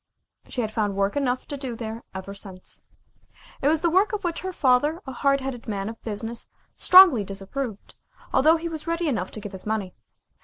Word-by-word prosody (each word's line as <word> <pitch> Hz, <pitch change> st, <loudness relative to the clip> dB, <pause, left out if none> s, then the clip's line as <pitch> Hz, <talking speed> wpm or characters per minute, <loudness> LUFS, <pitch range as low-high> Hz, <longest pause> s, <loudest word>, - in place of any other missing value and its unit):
She 250 Hz, -, -3 dB
had 215 Hz, -2 st, -2 dB
found 210 Hz, -2 st, -1 dB
work 200 Hz, 0 st, 0 dB
enough 255 Hz, -3 st, 0 dB
to 285 Hz, -, -4 dB
do 260 Hz, -4 st, -4 dB
there 225 Hz, 0 st, -6 dB
ever 190 Hz, +1 st, -6 dB
since. 195 Hz, -2 st, -6 dB, 0.8 s
It 275 Hz, -, +2 dB
was 315 Hz, +2 st, +2 dB
work 375 Hz, +6 st, +3 dB
of 415 Hz, -1 st, -2 dB
which 345 Hz, -2 st, -2 dB
her 375 Hz, -, -4 dB
father, 295 Hz, +1 st, +2 dB
a 265 Hz, -, -6 dB
hard 275 Hz, +2 st, +1 dB
headed 260 Hz, -3 st, -5 dB
man 200 Hz, -1 st, -2 dB
of 225 Hz, -, -10 dB
business, 225 Hz, +2 st, -5 dB, 0.3 s
strongly 365 Hz, -, +8 dB
disapproved, 200 Hz, +4 st, -5 dB, 0.4 s
although 310 Hz, +5 st, +5 dB
he 335 Hz, +1 st, -4 dB
was 315 Hz, -2 st, -6 dB
ready 335 Hz, 0 st, 0 dB
enough 205 Hz, -10 st, -1 dB
to -, -, -6 dB
give 205 Hz, -1 st, -7 dB
his 190 Hz, +1 st, -7 dB
money. 210 Hz, -4 st, -2 dB
245 Hz, 195 wpm, -25 LUFS, 205-305 Hz, 0.8 s, strongly